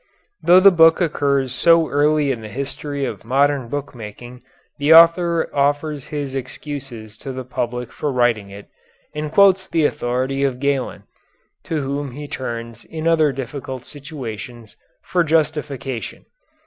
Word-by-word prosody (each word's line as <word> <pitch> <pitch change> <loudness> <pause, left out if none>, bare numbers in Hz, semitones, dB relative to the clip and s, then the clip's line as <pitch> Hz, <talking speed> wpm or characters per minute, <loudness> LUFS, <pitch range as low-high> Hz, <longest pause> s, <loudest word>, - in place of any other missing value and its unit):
Though 180 +2 +6
the 200 +1 +7
book 165 -2 +5
occurs 140 -6 0
so 165 +3 +4
early 145 0 +2
in 120 -4 -4
the 110 - -8
history 140 +3 -4
of 110 -6 -6
modern 135 +1 +1
book 145 +3 -5
making 120 +2 -10 0.4
the 150 +3 +6
author 170 0 +5
offers 145 0 0
his 145 -3 -4
excuses 130 -4 -7
to 135 - -6
the 130 0 -6
public 125 -1 -4
for 150 - -3
writing 120 -5 +1
it, 100 +1 -11 0.5
and 150 0 -4
quotes 190 0 +4
the 165 -4 +1
authority 130 +2 -1
of 130 -3 -1
Galen, 140 -2 -1 0.6
to 155 -3 -2
whom 140 -1 -4
he 145 +2 -7
turns 115 -3 -6
in 160 0 -5
other 160 -3 +3
difficult 130 -1 -6
situations, 125 -6 -9 0.3
for 180 -1 +1
justification. 150 -5 -2
140 Hz, 145 wpm, -20 LUFS, 125-150 Hz, 0.6 s, the